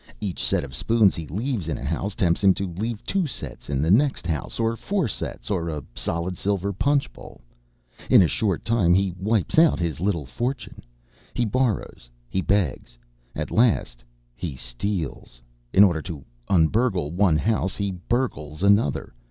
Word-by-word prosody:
Each 95 -4 -4
set - - +1
of 65 -2 -8
spoons 110 - +3
he 80 -3 -6
leaves 105 - -2
in 80 - -2
a - - -7
house 100 0 -2
tempts 85 +1 +1
him 95 -1 +6
to 100 - -2
leave 110 +4 -4
two 190 -4 0
sets 130 - -8
in 70 0 0
the 80 - +2
next 130 0 +3
house, 80 - -3
or 115 0 +1
four 190 - -1
sets, 105 - -5
or 85 -4 -1
a 75 -3 -4
solid 85 +8 -3
silver 100 0 0
punch 140 +8 +1
bowl. - - -13 0.7
In - - +7
a - - +3
short 95 0 -1
time 100 -7 +3
he 95 -1 +1
wipes 105 - +1
out 165 -1 +5
his 85 -3 -2
little 90 -5 0
fortune. 120 - -4 0.5
He 120 - +1
borrows. 110 - -1 0.2
He 95 - 0
begs. 90 -11 -1 0.4
At - - -4
last 105 - +2 0.3
he 70 +3 -5
steals! 65 0 -4 0.3
In 100 - +7
order 85 -5 +3
to 75 -4 -8 0.2
un 80 -1 +4
burgle 100 - 0
one 90 -3 +3
house 95 +2 0
he 100 -1 -2 0.2
burgles 80 - -1
another. 100 - +2
95 Hz, 175 wpm, -24 LUFS, 80-110 Hz, 0.7 s, In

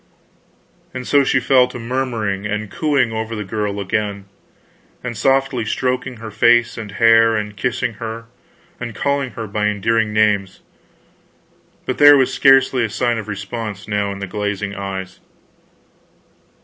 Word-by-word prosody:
And 130 -1 -5
so 145 -1 +4
she - - +2
fell 130 -2 +4
to 125 - -9
murmuring 115 -5 -2
and 105 -1 -4
cooing 140 -2 +1
over 110 +1 -4
the 105 - -4
girl 105 0 -3
again, 100 0 -2 0.8
and 125 -2 -4
softly 135 +1 +1
stroking 125 +3 -2
her 110 0 -8
face 120 +2 +3
and 110 -4 -7
hair, 115 0 +5
and 105 -1 -4
kissing 125 +2 -2
her 115 0 -5 0.5
and 120 -5 -6
calling 140 -2 -1
her 115 - -5
by 105 0 -1
endearing 105 +2 0
names; 105 -3 +1 1.2
but 130 - -3
there 145 0 +9
was 130 -1 +2
scarcely 135 -4 +4
sign 120 +2 0
of 110 - -7
response 105 0 -6
now 105 -1 -1
in 100 - -6
the 100 - -5
glazing 105 0 -3
eyes. 95 -2 -6
110 Hz, 145 wpm, -19 LUFS, 105-125 Hz, 1.2 s, there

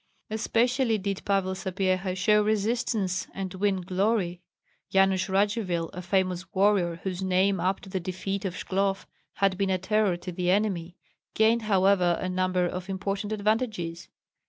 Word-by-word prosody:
Especially 235 +2 +1
did 200 -1 -3
Pavel 195 -2 +1
Sapyeha 185 0 -1
show 210 +3 +4
resistance 215 -2 0
and 190 -1 -4
win 190 0 0
glory. 185 -1 0 0.5
Yanush 195 0 +3
Radzivill, 195 -4 0
a 180 - -6
famous 185 -1 -1
warrior, 190 -3 +3
whose 185 -1 -3
name 190 +1 +2
up 185 +3 0
to - - -12
the 190 - -2
defeat 185 +3 -4
at 190 -3 -2
Shklov 195 +1 -1 0.3
had 195 -1 +1
been 195 -1 +1
a 190 - +2
terror 200 -1 +1
to 180 +1 -7
the 180 0 -1
enemy, 185 -3 0 0.4
gained 225 +2 +4
however 190 -4 +3
a 185 - -2
number 185 0 +1
of 180 +2 -4
important 195 +2 -3
advantages. 210 -5 -1
190 Hz, 150 wpm, -27 LUFS, 185-205 Hz, 0.5 s, show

